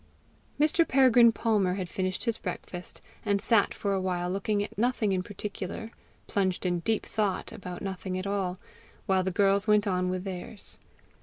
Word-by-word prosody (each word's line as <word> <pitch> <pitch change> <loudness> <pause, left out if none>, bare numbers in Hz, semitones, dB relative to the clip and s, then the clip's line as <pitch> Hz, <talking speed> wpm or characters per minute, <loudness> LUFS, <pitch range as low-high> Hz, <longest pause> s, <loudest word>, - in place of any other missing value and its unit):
Mr. 305 +3 +4
Peregrine 250 -3 +6
Palmer 210 -5 +1
had 185 -2 -3
finished 185 +1 -2
his 230 -2 -1
breakfast, 180 -1 -7 0.2
and 200 -1 +1
sat 220 0 +3
for 200 -1 -2
a 190 - 0
while 180 -1 -1
looking 205 +1 0
at - - -8
nothing 225 -1 +1
in 185 -1 +1
particular, 205 +2 -6 0.3
plunged 190 -2 -1
in 175 -1 +1
deep 220 +5 0
thought 205 -4 -1
about 180 -1 -7
nothing 190 -1 -4
at 185 - -4
all, 195 -2 -1 0.5
while 190 -1 +3
the 190 - 0
girls 200 +2 +3
went 210 0 +4
on 180 -2 0
with 185 0 -2
theirs. 195 +2 -7
195 Hz, 170 wpm, -28 LUFS, 185-210 Hz, 0.5 s, Peregrine